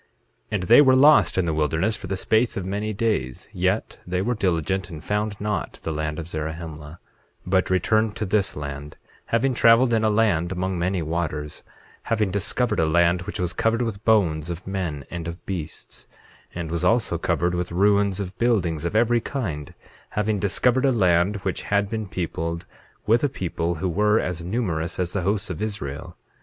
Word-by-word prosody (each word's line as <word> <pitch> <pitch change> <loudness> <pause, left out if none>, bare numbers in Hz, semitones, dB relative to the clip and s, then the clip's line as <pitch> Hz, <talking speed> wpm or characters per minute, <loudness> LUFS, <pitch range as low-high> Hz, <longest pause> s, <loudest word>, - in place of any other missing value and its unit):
8:8 105 - +1
And 90 - -4
they 120 +9 +7
were 130 -2 +6
lost 145 -2 +6
in 95 - +2
the 80 - 0
wilderness 80 +7 +1
for 100 -2 -8
the 95 +1 -2
space 110 +4 +1
of 95 - -3
many 105 +3 -2
days, 100 - -2
yet 95 +4 -1
they 90 0 -1
were 115 +6 0
diligent, 95 -2 -1
and 80 -3 -9
found 105 +1 -2
not 105 0 -2
the 80 - -2
land 75 0 -3
of 80 -2 -5
Zarahemla 80 -1 -6 0.5
but 95 0 +1
returned 110 +4 +2
to 110 - -2
this 100 0 0
land, 70 0 -7 0.3
having 125 +3 +1
traveled 115 +1 +5
in 110 -1 +2
a 110 - +3
land 100 -6 +2
among 95 0 -2
many 90 0 0
waters, 75 -2 -3 0.5
having 110 -4 +1
discovered 100 +5 0
a 80 - +3
land 85 +2 +3
which - - -5
was 90 -2 -1
covered 115 +2 +1
with 110 -3 -4
bones 85 -8 +2
of 85 +1 -6
men, 90 -7 -3
and 85 -2 -5
of 85 +2 -7
beasts, 80 -6 -6 0.5
and 85 -2 -4
was 85 -1 -2
also 115 -1 +2
covered 85 +1 0
with 90 0 -2
ruins 100 +1 +2
of 95 -1 -5
buildings 90 -10 +1
of 85 - -2
every 120 +1 +3
kind, 85 - -4 0.4
having 105 -1 +1
discovered 125 +6 +2
a 135 - +4
land 90 -3 +3
which 95 - -1
had 100 0 0
been 110 -2 -3
peopled 85 -2 -3 0.4
with 115 +3 +3
a 145 - +3
people 85 -4 -2
who 95 +4 -2
were 105 +5 +2
as 90 -2 -3
numerous 85 -5 -2
as 90 -1 -2
the 100 - 0
hosts 100 +1 -1
of 90 - -6
Israel. 90 -10 -5
95 Hz, 190 wpm, -24 LUFS, 85-110 Hz, 0.5 s, they